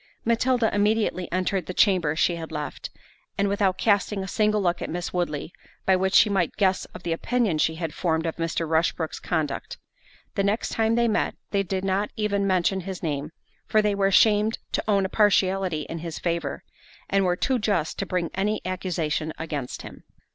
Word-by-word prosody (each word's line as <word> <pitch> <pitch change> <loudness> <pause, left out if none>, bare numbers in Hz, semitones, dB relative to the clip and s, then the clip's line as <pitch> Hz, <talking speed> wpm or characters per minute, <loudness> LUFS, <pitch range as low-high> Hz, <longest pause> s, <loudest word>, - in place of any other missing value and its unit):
Matilda 235 0 +2
immediately 205 -3 +1
entered 185 0 -1
the 185 - -5
chamber 180 -7 +3
she 170 +2 +2
had 165 -1 -7
left, 150 -3 -5 0.5
and 200 - +2
without 195 -2 +1
casting 205 -1 +1
a - - -6
single 210 +2 +2
look 180 -3 0
at - - -3
Miss 175 +1 -4
Woodley 170 -3 -2 0.3
by 190 - +5
which 190 +1 +1
she - - +7
might 190 -5 0
guess 190 -2 +2
of - - -12
the 170 - 0
opinion 215 -2 0
she 160 +1 +2
had 160 -2 -4
formed 165 -2 0
of 165 - -3
Mr. 165 0 -1
Rushbrook's 160 0 0
conduct. 155 -4 -2 0.6
The - - 0
next 205 +3 0
time 225 0 +1
they 235 0 +3
met 220 - 0 0.2
they 200 - +2
did 190 0 -2
not 195 +2 0
even 200 -2 0
mention 185 0 +2
his 185 0 -6
name; 150 -2 -2 0.4
for 215 - +3
they 210 -1 +2
were 200 -1 +2
ashamed 210 +2 +4
to - - -1
own 200 -2 +3
a - - +1
partiality 190 -5 +2
in 165 - -6
his 165 -1 -5
favour, 170 -5 -2 0.4
and 195 0 +2
were 180 -1 +2
too 255 +6 0
just 200 -7 0
to 195 - -2
bring 175 -2 -1
any 210 +3 0
accusation 170 -4 -2
against 150 -5 -5
him. - - -11
185 Hz, 190 wpm, -25 LUFS, 165-205 Hz, 0.6 s, she